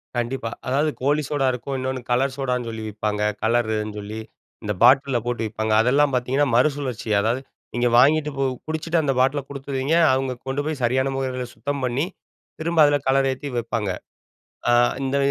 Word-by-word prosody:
கண்டிப்பா. 120 0 -2 0.2
அதாவது 140 +4 +2
கோலி 145 +3 +2
சோடா 140 -2 +1
இருக்கும், 125 +2 -4
இன்னொன்னு 130 0 -3
கலர் 130 +2 +1
சோடான்னு 125 -3 -1
சொல்லி 110 -1 -6
விப்பாங்க, 105 0 -2 0.2
கலருன்னு 110 -2 0
சொல்லி. 105 +2 -6 0.4
இந்த 105 0 -1
பாட்டில்ல 130 0 +5
போட்டு 120 -2 -2
விப்பாங்க. 110 0 -2
அதெல்லாம் 140 +4 +3
பாத்தீங்கன்னா 130 +4 +1
மறுசுழற்சி. 130 -3 0
அதாவது, 115 +5 0 0.3
நீங்க 120 0 +1
வாங்கிட்டு 150 +4 +4
போ 135 - +1 0.2
குடிச்சிட்டு 160 +1 0
அந்த 140 -2 +1
பாட்டில 135 +3 +2
குடுத்துருவீங்க. 140 +1 -2 0.2
அவங்க 130 0 0
கொண்டு 135 +2 -1
போய் 155 -4 -3
சரியான 130 +3 +1
முறைல 130 -1 -2
சுத்தம் 140 +5 -3
பண்ணி, 125 +5 0 0.5
திரும்ப 165 +1 -1
அதுல 145 0 +3
கலர் 135 0 +3
ஏத்தி 135 +2 -5
வைப்பாங்க. 115 -3 -2 0.8
அ - - +5 0.3
இந்த 135 +1 0
130 Hz, 160 wpm, -23 LUFS, 120-140 Hz, 0.8 s, பாட்டில்ல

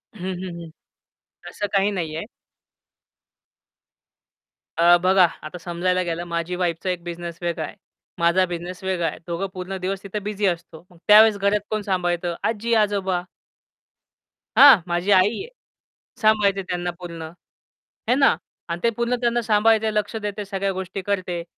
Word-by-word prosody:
हं, 190 -1 -4
हं, 170 -2 -6
हं. 165 - -9 0.8
असं 205 - -3
काही 195 +1 +3
नाही 165 -5 -3
आहे. 165 - -5 2.5
अ, 175 +1 +6
बघा, 185 0 +6 0.2
आता 155 +3 -7
समजायला 180 +1 -1
गेलं 170 0 -3
माझी 170 +1 -3
वाईफचा 175 0 -2
एक 180 -2 -3
बिझनेस 170 -1 -6
वेगळा 170 -2 -2
आहे. - - -10 0.4
माझा 170 +2 +3
बिझनेस 175 +1 -6
वेगळा 180 -3 0
आहे. - - -4
दोघं 170 +3 -2
पूर्ण 185 +1 -5
दिवस 195 +1 -3
तिथे 200 +2 -4
बिझी 205 0 -3
असतो. 170 -2 -3
मग 175 - -20
त्यावेळेस 210 0 +7
घरात 200 +1 +2
कोण 215 -1 -1
सांभाळतं? 175 -3 -1
आजी-आजोबा. 205 -5 +1 1.4
हां, 275 -10 +9
माझी 175 +3 0
आई 185 0 +6
आहे. 415 - -7 0.7
सांभाळते 210 -2 +3
त्यांना 175 -1 -3
पूर्ण. 170 -2 -7 0.9
है 250 - +5
ना. 275 - +4 0.3
आणि 170 +1 -3
ते 235 - +4
पूर्ण 235 +1 +1
त्यांना 240 0 +1
सांभाळते, 220 0 +3
लक्ष 210 +2 -1
देते, 210 -1 -4
सगळ्या 195 0 -2
गोष्टी 190 +1 -5
करते. 180 -3 -2
185 Hz, 145 wpm, -23 LUFS, 175-205 Hz, 2.5 s, हां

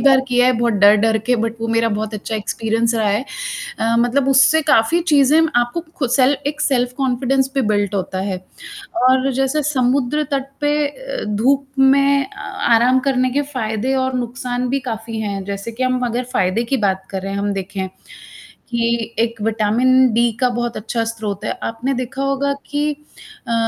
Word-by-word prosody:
बार 265 -1 +5
किया 245 0 +3
है, 255 - +4
बहुत 235 -1 +1
डर-डर 210 +2 +4
के 250 - +3
बट 225 0 -3
वो 230 - -3
मेरा 230 0 +2
बहुत 215 +1 -3
अच्छा 215 +1 -5
एक्सपीरियंस 225 +2 -1
रहा 220 -2 +1
है। 205 +5 0 0.5
अ, 230 +1 +1
मतलब 250 +3 +1
उससे 275 +4 +5
काफ़ी 280 +6 +3
चीज़ें 290 +2 +5 0.2
आपको 240 +7 -2 0.2
खुद 260 -7 -1
सेल 265 +2 +3
एक 295 +1 -3
सेल्फ 250 -4 +1
कॉन्फिडेंस 265 0 +1
पे 270 - +1
बिल्ड 205 -1 0
होता 190 -1 -2
है। 190 - -2 0.7
और 260 +1 +3
जैसे 270 +4 0
समुद्र 270 +1 +1
तट 275 -1 -2
पे 290 0 +2
अ, - - -6
धूप 270 +6 +2
में 275 +1 +4
अ 405 - -16 0.3
आराम 245 +3 +5
करने 255 -1 +1
के 285 +3 +1
फ़ायदे 225 +1 -1
और 260 0 0
नुकसान 245 0 -3
भी 275 - 0
काफ़ी 225 0 -5
हैं, 200 -2 -3
जैसे 200 +3 -5
कि 240 +3 -4
हम 255 0 0
अगर 240 +1 -2
फ़ायदे 195 +1 +1
की - - +3
बात 190 0 -2
करें 195 0 -4
हम 200 0 -1
देखें, 190 0 -4 0.8
कि 235 -1 -1
एक 230 -1 -1
विटामिन-डी 235 +2 +3
का 255 -2 +3
बहुत 240 -1 -3
अच्छा 230 +2 -2
स्रोत 220 -3 -4
है, - - -1
आपने 235 +4 -2
देखा 255 +1 -4
होगा 275 +1 0
कि 295 +1 -1 0.6
अ, 235 - -1
245 Hz, 175 wpm, -19 LUFS, 225-270 Hz, 0.8 s, बार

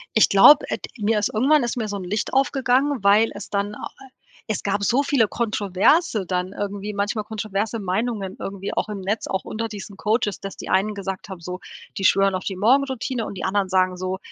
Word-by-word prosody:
Ich 220 - +5
glaube, 275 +10 +7
ed - - -3
mir 215 +1 +1
ist 205 - -1
irgendwann 275 +6 +3
ist 240 - -2
mir 220 -3 -1
so 205 - -4
'n 190 - -6
Licht 205 +7 -3
aufgegangen, 270 -1 +1
weil 210 +3 +5
es 205 - -9
dann 205 +1 -2
a - - -6
äh 265 -1 -14 0.4
es 215 - -2
gab 200 0 -1
so 260 +7 +2
viele 265 -7 +2
Kontroverse 215 - +1
dann 180 +1 -2
irgendwie, 205 +1 -4
manchmal 205 +1 -1
kontroverse 215 +1 -3
Meinungen 195 0 -2
irgendwie 195 0 -5
auch - - -1
im 205 -2 -5
Netz, 205 +4 -2
auch 190 - -2
unter 225 +1 -4
diesen 205 -1 -8
Coaches, 210 0 -1
dass 195 - -7
die - - -8
einen 195 +3 +2
gesagt 195 -1 -5
haben, 190 -2 -7
so, 180 +2 -6 0.4
die 195 - -3
schwören 195 0 +4
auf 185 - -4
die 190 -2 -4
Morgenroutine 255 +1 +1
und 200 - -7
die - - -4
anderen 195 0 0
sagen 185 -1 +2
so: 185 +1 -3
205 Hz, 215 wpm, -23 LUFS, 195-225 Hz, 0.4 s, glaube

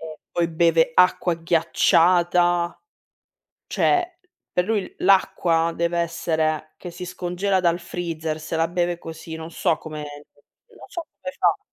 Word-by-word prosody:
E 155 -1 -9
poi 170 -1 +1
beve 165 0 +3
acqua 180 -1 +4
ghiacciata 175 +1 +3 1.0
cioè 360 -1 +2 0.4
per 180 0 +1
lui 215 -3 -1
l'acqua 170 -3 +3
deve 170 0 0
essere 160 -2 -1
che 180 - -8
si 180 +1 -7
scongela 180 +2 -1
dal 170 0 +2
freezer, 165 -2 -4
se 155 +1 -5
la 165 0 +2
beve 175 0 -1
così. 160 -1 -8
Non 160 +1 -7
so 160 - +1
come 155 -1 -8 0.7
non - - -15
so 340 - -5 0.2
come 275 - -4
fa. - - +3
170 Hz, 140 wpm, -23 LUFS, 160-180 Hz, 1.0 s, acqua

